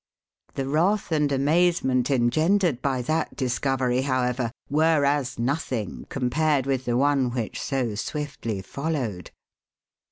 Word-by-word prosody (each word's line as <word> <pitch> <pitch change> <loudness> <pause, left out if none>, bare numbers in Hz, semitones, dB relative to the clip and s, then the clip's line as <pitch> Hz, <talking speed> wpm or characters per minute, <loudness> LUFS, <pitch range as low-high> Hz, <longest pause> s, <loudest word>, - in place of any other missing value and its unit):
The 135 -1 -2
wrath 175 +8 +1
and 150 -2 +2
amazement 140 -3 +2
engendered 155 +4 +2
by 130 -3 0
that 155 +5 -1
discovery, 130 0 0
however, 130 -2 0 0.2
were 155 0 +3
as 140 -2 0
nothing 120 - -2
compared 135 +2 +1
with 135 -2 -1
the 120 0 +1
one 140 -1 +2
which 120 -3 -4
so 130 -6 -1
swiftly 115 -4 -4
followed. 130 - -3
135 Hz, 120 wpm, -25 LUFS, 125-150 Hz, 0.2 s, were